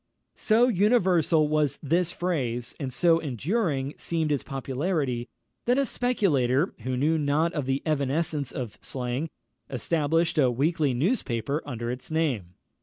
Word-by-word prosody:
So 230 +3 +4
universal 185 -8 +3
was 150 -2 +1
this 170 +4 +1
phrase, 125 -11 -2
and 135 -4 -3
so 165 +3 +3
enduring 145 - -1
seemed 160 -2 -1
its 145 - +1
popularity, 135 -2 -2 0.4
that 245 +2 +3
a 275 - +3
speculator, 170 - +1
who 130 0 -3
knew 155 +4 +2
not 150 +3 +1
the 135 +1 -1
evanescence 145 -1 0
of 120 -5 -6
slang, 130 +4 -3 0.4
established 160 +4 +1
a 130 -3 +5
weekly 145 +2 +1
newspaper 140 - 0
under 120 -3 -3
its 125 +1 -7
name. 130 - -1
150 Hz, 130 wpm, -26 LUFS, 130-170 Hz, 0.4 s, a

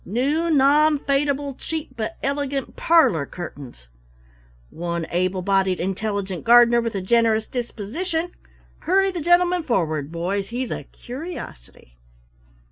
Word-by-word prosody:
New 285 - 0
Non 300 +1 +4
fadable 280 0 -1
Cheap 320 -1 -5
but 220 -1 -4
Elegant 280 0 -2
Parlor 265 - +3
Curtains 140 - -9 0.8
One 170 0 -3
Able 185 +1 0
bodied 195 -1 +1
Intelligent 195 0 -3
Gardener, 240 0 +6
with 230 -2 -3
a 195 - -2
Generous 220 +2 +2
Disposition 320 - -4 0.5
hurry 390 +2 +2
the 350 -3 -4
gentleman 350 +2 +3
forward, 160 - -1
boys, 190 +4 -2
he's 245 +3 -4
a - - -4
curiosity! 240 - -10
235 Hz, 120 wpm, -22 LUFS, 185-295 Hz, 0.8 s, Gardener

